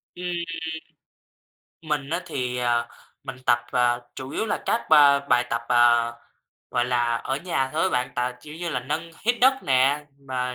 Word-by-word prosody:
Ừm. 180 - -7 1.6
Mình 150 -3 -2
á 170 +2 0
thì, 125 -6 -3
à, 120 -1 0 0.4
mình 130 - -6
tập, 120 - +5
à, 120 -1 +3 0.2
chủ 130 0 -7
yếu 220 - -2
là - - -2
các 230 - 0
ba 145 -2 +7
bài 125 -3 +2
tập, 115 0 -1
à, 120 -1 +4 0.6
gọi 120 - +1
là, 120 -1 +1
ở 135 +3 -3
nhà 140 -5 -1
thôi 160 +1 0
á - - +3
bạn, 125 -6 -1
tà 125 +1 -1
kiểu 150 0 -11
như 170 +2 -4
là, 130 -6 -2
nâng 155 +6 -4
hít 235 +2 +3
đất 265 +2 +6
nè, 135 +2 +2
mà 130 -2 -3
130 Hz, 180 wpm, -24 LUFS, 125-150 Hz, 1.6 s, ba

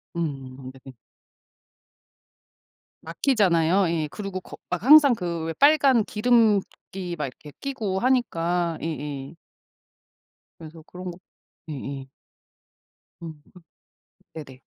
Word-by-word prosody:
음. 135 -5 -5
네. 135 0 -13 2.1
막히잖아요. 180 - +2
예. 160 -2 -1
그리고 195 -3 -5
거 - - -12
막 180 +1 -3
항상 280 -1 +8
그 170 -4 -4
왜 165 - -3
빨간 275 - +4
기름기 210 -5 0
막 150 - -2
이렇게 145 +3 -12
끼고 220 -9 -3
하니까 175 -9 0
예예. 145 -2 -5 1.2
그래서 160 0 -12
그런 180 +2 -8
거 170 - -12 0.5
예에. 135 -2 -6 1.1
음. 160 -3 -9 0.9
네네. 135 -5 -10
170 Hz, 180 characters per minute, -24 LUFS, 155-210 Hz, 2.1 s, 항상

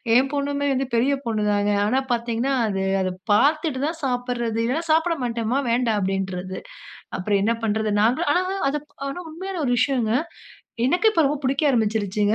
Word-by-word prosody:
என் 265 +2 +4
பொண்ணுமே 285 0 -1
வந்து 265 0 -1
பெரிய 255 +5 +3
பொண்ணு 220 -2 -1
தாங்க. 205 0 +1
ஆனா, 255 +6 +2
பாத்தீங்கனா 235 +3 -1
அது, 195 -2 -1 0.2
அத 185 0 -1 0.2
பாத்துட்டு 290 +3 +2
தா 310 - 0
சாப்பிட்றது. 245 -3 -1
இல்லைனா 275 +8 -1
சாப்பிட 325 +1 +2
மாட்டேமா. 235 +1 -1
வேண்டா. 235 -1 +2
அப்டின்றது. 190 -1 -3 0.6
அப்புறம் 200 +1 +1
என்ன 230 +2 +2
பண்றது, 220 0 0
நாங்களும் 245 +6 +2
ஆனா 360 - +3 0.3
அத 290 - -2 0.3
ஆனா, 275 - -5
உண்மையான 365 +1 -5
ஒரு 245 - +1
விஷயங்க. 250 -5 +1 0.7
எனக்கு 355 +10 +3
இப்ப 325 -6 +3
ரொம்ப 290 +1 -1
புடிக்க 275 +3 +2
ஆரம்பிச்சுருச்சுங்க. 210 -2 +1
245 Hz, 160 wpm, -23 LUFS, 215-280 Hz, 0.7 s, என்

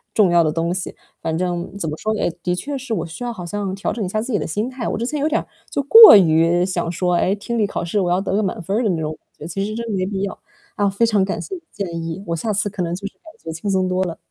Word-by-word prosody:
重 200 -5 +4
要 170 -1 +5
的 155 - +1
东 165 +2 -1
西。 185 -1 -5 0.3
反 160 0 -2
正 180 +1 -3
怎 170 - -3
么 150 - -3
说 215 +5 -1
呢， - - -3
哎， - - +2
的 180 0 0
确 280 +10 -4
是 265 -3 -4
我 165 - -2
需 165 +7 -8
要 240 - -2
好 185 -7 -7
像 195 +1 -3
调 195 +1 -2
整 220 -1 -3
一 185 - -3
下 215 - -1
自 245 +4 -5
己 205 - +2
的 - - -3
心 210 +9 -2
态。 255 -2 -5
我 - - -2
之 230 - -2
前 295 +4 -2
有 300 +2 +1
点 315 - 0 0.3
就 280 - -1
过 445 - +11
于 170 0 +3
想 175 -3 -2
说， 180 0 0
哎， 180 +3 +2
听 235 +3 -3
力 210 - +2
考 185 - -4
试 190 +5 0
我 180 -3 +1
要 180 +1 +2
得 190 -1 -2
个 210 - +2
满 190 -4 -2
分 195 +4 -2
儿 245 - +1
的 215 - +1
那 170 -3 0
种， 155 0 -2
我 155 - -9 0.2
觉 - - -11
得 - - -5
其 185 +4 -3
实 215 +1 -4
真 235 +1 -4
的 220 - -3
没 185 -1 0
必 195 -1 -3
要。 200 - -4 0.4
啊， 205 -1 +2
非 200 +4 +2
常 210 -4 +2
感 195 - -3
谢 395 - -7
你 - - -8
的 - - -44
建 170 -4 -4
议， 165 +4 -5
我 170 - -1
下 215 +7 -2
次 205 +1 0
可 195 -1 -5
能 170 0 -2
就 195 +3 -8
是 - - -11
感 - - -43 0.2
觉 165 - -5
轻 165 +5 -4
松 190 -1 +1
多 185 +1 0
了。 170 -3 -4
190 Hz, 360 characters per minute, -20 LUFS, 170-215 Hz, 0.4 s, 过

